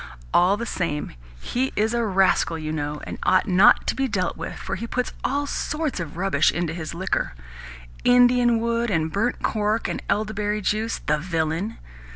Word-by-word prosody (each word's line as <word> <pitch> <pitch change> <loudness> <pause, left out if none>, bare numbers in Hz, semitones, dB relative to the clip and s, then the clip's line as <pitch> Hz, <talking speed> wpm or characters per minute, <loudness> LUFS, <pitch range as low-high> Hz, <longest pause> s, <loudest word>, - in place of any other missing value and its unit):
All 185 +3 +4
the 235 - -4
same, 165 -9 -3 0.3
he 260 +2 -1
is 220 +2 +1
a 235 0 +1
rascal, 190 -5 +2
you 155 -1 -4
know, 150 -1 -3
and - - -7
ought 185 0 +3
not 185 +2 +5
to - - 0
be 270 0 0
dealt 185 -6 -1
with, 165 - -6
for 195 - -5
he 230 - -5
puts 250 +1 -2
all 285 +2 0
sorts 300 - -2
of 165 -2 -6
rubbish 195 +2 +2
into 175 -2 -2
his 165 -1 -6
liquor 185 - -2 0.7
Indian 245 -1 +5
wood 235 +1 0
and 160 -4 0
burnt 220 +7 -1
cork 215 +1 0
and - - -3
elderberry 210 0 0
juice, 215 +3 -1
the 150 0 +1
villain! 165 +5 -2
200 Hz, 180 wpm, -24 LUFS, 170-235 Hz, 0.7 s, not